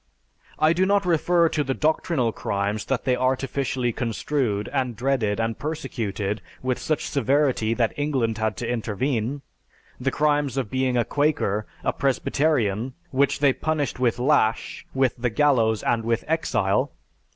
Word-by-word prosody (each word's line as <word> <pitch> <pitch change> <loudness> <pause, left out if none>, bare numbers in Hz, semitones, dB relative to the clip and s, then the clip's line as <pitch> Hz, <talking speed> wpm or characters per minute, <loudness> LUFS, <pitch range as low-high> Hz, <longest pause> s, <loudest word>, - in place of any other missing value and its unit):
I 155 +1 +4
do 185 +2 +2
not 200 -1 +2
refer 170 0 +3
to 150 - 0
the 135 -1 -2
doctrinal 155 -5 +1
crimes 100 +1 -2
that 135 -3 -1
they 125 - +3
artificially 130 -1 0
construed 115 -2 -1
and 130 -4 -1
dreaded 120 -4 0
and 115 -1 -1
persecuted 110 -9 -3 0.2
with 130 -1 0
such 155 -2 -1
severity 135 -4 +1
that 115 -2 +1
England 130 -7 0
had 110 -1 -1
to 120 - -3
intervene: 120 +3 -2 0.6
the 130 +2 0
crimes 145 -2 +1
of 125 -6 -2
being 130 -1 +1
a 120 - +2
Quaker, 140 -8 0 0.2
a - - +1
Presbyterian, 130 -4 0 0.2
which 140 0 +2
they 140 -2 +5
punished 150 -4 -2
with 120 -3 +2
lash, 125 -4 +1
with 130 -2 +2
the 120 0 0
gallows, 115 -4 +2
and 115 -1 +1
with 115 0 0
exile. 115 -11 +1
130 Hz, 150 wpm, -24 LUFS, 115-145 Hz, 0.6 s, they